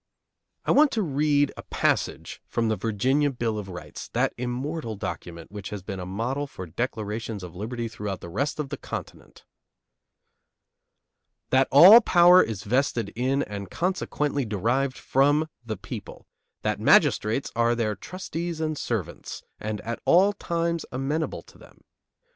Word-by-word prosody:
I - - +2
want 300 -1 +5
you 220 - +1
to - - -3
read 145 0 +2
a - - -6
passage - - -1
from 115 -1 0
the 110 - +1
Virginia 130 +8 +1
Bill 115 -5 -2
of 100 -2 -7
Rights, 90 -1 -8
that - - +1
immortal 125 +1 -3
document 85 -4 -7
which 100 -2 -7
has 105 -3 -6
been 95 -1 -5
a 90 - -6
model 125 +9 -2
for 95 -8 -8
declarations 110 +1 -4
of 90 -2 -9
liberty 115 +4 -4
throughout 105 -4 -5
the - - -9
rest 140 - -2
of 145 -3 -3
the - - -4
continent: - - -8 2.1
That 130 0 +4
all 185 - +10
power 180 -2 +7
is 105 -3 -3
vested 115 -3 0
in, 130 +4 +1
and 100 -2 -6
consequently 150 - -1
derived 120 +5 0
from, 145 +4 +2 0.2
the 110 -2 -4
people; - - -8 0.4
that - - 0
magistrates 110 +6 +3
are 120 0 +2
their 110 -2 0
trustees 170 - -5
and 155 -2 -2
servants, 95 -8 -4 0.2
and 110 -1 -4
at 115 +1 -4
all 195 +4 +5
times 170 -3 -2
amenable 145 +5 -2
to - - -19
them. - - -18
125 Hz, 155 wpm, -26 LUFS, 105-150 Hz, 2.1 s, all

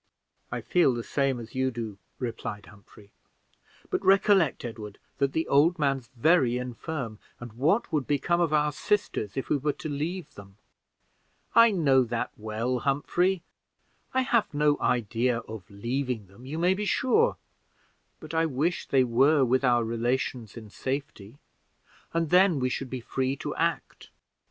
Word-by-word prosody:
"I - - -3
feel 170 -8 +3
the 120 - -4
same 135 -1 0
as 115 -1 -10
you 130 0 +1
do," 115 -5 -6 0.2
replied 115 -4 -5
Humphrey: 100 0 -18 0.8
"but - - -1
recollect, 195 -6 +3
Edward, 110 -3 -7 0.2
that 140 -1 +1
the 160 - -1
old 160 +6 +4
man's 135 -5 -1
very 125 -2 +3
infirm, 125 -2 -5 0.2
and 120 -2 -9
what 160 - +1
would 145 -4 0
become 170 +4 +1
of 165 -3 +1
our 150 -1 +2
sisters 145 - -1
if 135 - -2
we 150 - +2
were 145 +1 -1
to 155 - -7
leave 160 +5 -4
them?" 100 -1 -14 1.0
"I 230 0 +7
know 145 -10 +3
that 120 -1 -3
well, 110 +4 -2
Humphrey 175 +7 0 0.7
I 260 - +2
have 235 -7 +1
no 150 0 +3
idea 120 +1 +1
of 110 -4 -10
leaving 120 +2 -3
them, 100 +7 -15
you 150 +4 -4
may 175 +3 +3
be 210 +2 -3
sure; 360 - +2 0.8
but 155 0 -10
I 165 0 +2
wish 155 +5 -1
they 135 -2 +4
were 135 +4 +4
with 130 +2 +1
our 120 -2 +3
relations 115 0 -2
in 110 -3 -10
safety, 135 -4 -5 0.7
and 165 -2 -1
then 180 -4 +5
we 130 0 0
should 130 +1 -4
be 130 -1 -5
free 130 +3 -1
to - - -5
act." - - -2
135 Hz, 160 wpm, -27 LUFS, 115-160 Hz, 1.0 s, I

